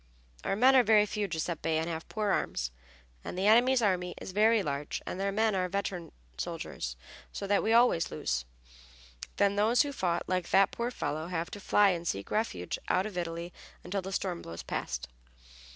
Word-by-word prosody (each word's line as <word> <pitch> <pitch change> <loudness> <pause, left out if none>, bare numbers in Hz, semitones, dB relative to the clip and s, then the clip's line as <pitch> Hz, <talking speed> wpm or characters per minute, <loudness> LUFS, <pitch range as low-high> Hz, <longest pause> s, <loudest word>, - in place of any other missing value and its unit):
"Our - - 0
men 255 +5 +5
are 260 - +8
very 215 -2 +5
few, 210 0 -2
Giuseppe, 165 -1 -1
and 160 +1 -1
have 165 -1 -5
poor 215 -2 -1
arms, 60 - -1 0.5
and - - -6
the 190 - 0
enemy's 240 +3 +5
army 180 -3 0
is - - -7
very 215 +2 +4
large 145 -2 -3
and 185 - -5
their 200 0 0
men 220 +1 +2
are 185 -1 0
veteran 185 -3 -3 0.3
soldiers, 60 0 -4 0.4
so 200 - -5
that 200 0 +2
we 220 - 0
always 230 -8 +4
lose. - - -2 0.9
Then 200 0 +3
those 225 +6 +4
who 290 - -4
fought, 175 -8 0
like 185 -2 -1
that 195 0 +5
poor 235 +1 -2
fellow, 155 -9 -3
have 170 -1 -3
to 205 - -7
fly 205 +1 +4
and 170 -1 -3
seek 100 -7 -3
refuge 150 - -2
out 185 - +2
of 215 -3 -6
Italy 170 0 -4 0.3
until 190 +2 -2
the 190 +1 -6
storm 185 -3 -2
blows 85 0 -8
past." 60 -1 -4
190 Hz, 190 wpm, -30 LUFS, 170-210 Hz, 0.9 s, are